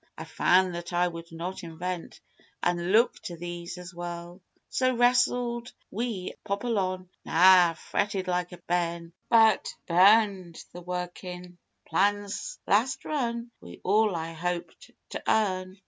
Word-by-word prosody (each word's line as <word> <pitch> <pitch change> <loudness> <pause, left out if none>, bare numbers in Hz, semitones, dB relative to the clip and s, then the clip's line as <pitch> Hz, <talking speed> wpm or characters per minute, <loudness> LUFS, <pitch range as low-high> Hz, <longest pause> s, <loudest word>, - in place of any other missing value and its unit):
I - - -6
found 185 0 +3
that 175 +1 -6
I 175 0 +2
could 165 0 -9
not 175 +3 -6
invent 170 +1 -6 0.4
an' 175 +1 0
look 230 +4 +4
to 175 - -7
these 175 +1 -6
as 180 0 -9
well. 175 +1 -7 0.3
So, 255 -1 +1
wrestled 245 0 +2 0.2
wi' 220 -4 -3
Apollyon 200 -3 -1 0.2
Nah! 180 0 +6
fretted 195 +3 -2
like 180 0 -1
a 180 - -9
bairn 170 -1 -2 0.2
But 225 -1 +5
burned 190 -1 +4 0.2
the 175 - -8
workin' 180 0 -6 0.3
plans 205 - 0
last 230 +7 +1
run 235 -5 -2
wi' - - -11
all 210 0 +3
I 165 0 -4
hoped 175 +1 -4 0.2
to - - -5
earn. 185 -3 +1
185 Hz, 130 wpm, -27 LUFS, 175-215 Hz, 0.4 s, Nah